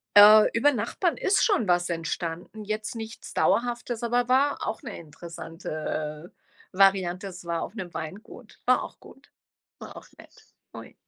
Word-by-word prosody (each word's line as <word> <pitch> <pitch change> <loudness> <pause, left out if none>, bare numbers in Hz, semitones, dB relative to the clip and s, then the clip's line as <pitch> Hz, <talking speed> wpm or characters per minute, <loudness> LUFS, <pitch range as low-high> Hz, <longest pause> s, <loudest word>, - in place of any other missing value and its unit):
Äh, 210 +1 +9
über 290 +6 +4
Nachbarn 255 - -1
ist 395 - +2
schon 380 - +2
was 175 0 +2
entstanden, 170 +4 -4
jetzt 215 +2 -4
nichts 225 0 -8
Dauerhaftes, 240 -1 0
aber 240 +1 +1
war 270 +3 +2
auch - - -4
'ne 240 -7 -7
interessante 160 -1 -6 0.4
Variante. 190 -1 +2
Es 180 -2 -10
war 170 -1 -2
auf 200 - -6
'nem 185 -6 -7
Weingut, 205 +8 -9
war 255 0 +3
auch - - -10
gut, - - -17 0.5
war - - -10
auch - - -11
nett. - - -16 0.4
Ui. - - -10
205 Hz, 150 wpm, -26 LUFS, 170-235 Hz, 0.5 s, Äh